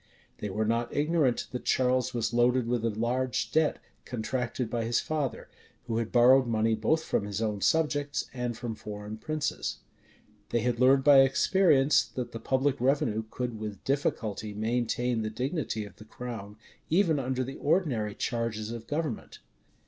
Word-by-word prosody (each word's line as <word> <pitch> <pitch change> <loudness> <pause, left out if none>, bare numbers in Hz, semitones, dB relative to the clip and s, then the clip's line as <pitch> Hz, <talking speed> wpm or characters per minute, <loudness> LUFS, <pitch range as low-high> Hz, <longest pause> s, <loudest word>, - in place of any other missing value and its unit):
They 105 - -3
were 105 +3 -1
not 115 +2 0
ignorant 150 -4 +1
that 125 - -5
Charles 130 0 +2
was 120 -1 -2
loaded 120 +1 +3
with 120 -1 0
a 115 - +2
large 120 +4 -1
debt, 160 -1 +2 0.3
contracted 125 0 -3
by 115 +1 -2
his 115 +1 +1
father, 145 -7 -3 0.4
who 115 -2 -2
had 115 -1 -3
borrowed 130 +2 +6
money 110 -1 +1
both 135 +9 +1
from 100 - -1
his 105 -1 -4
own 105 -3 -2
subjects 145 -1 +1
and 125 -2 -3
from 120 -2 -4
foreign 105 0 -7
princes. 155 +4 -3 0.7
They 120 - +1
had 120 0 0
learned 135 +1 +5
by 140 -1 +8
experience, 145 +1 +4
that 125 -2 -6
the 115 - -6
public 130 +2 0
revenue 125 -5 +1
could 120 -3 -4
with 105 -3 -6
difficulty 110 -6 -2
maintain 120 +2 0
the 110 - -2
dignity 125 -2 -3
of 100 - -14
the 105 - -13
crown, 110 -4 -7 0.3
even 165 -3 +3
under 130 0 -1
the 135 +2 -7
ordinary 125 - 0
charges 115 -2 -2
of 115 -1 -7
government. 150 -6 -3
120 Hz, 165 wpm, -29 LUFS, 110-135 Hz, 0.7 s, by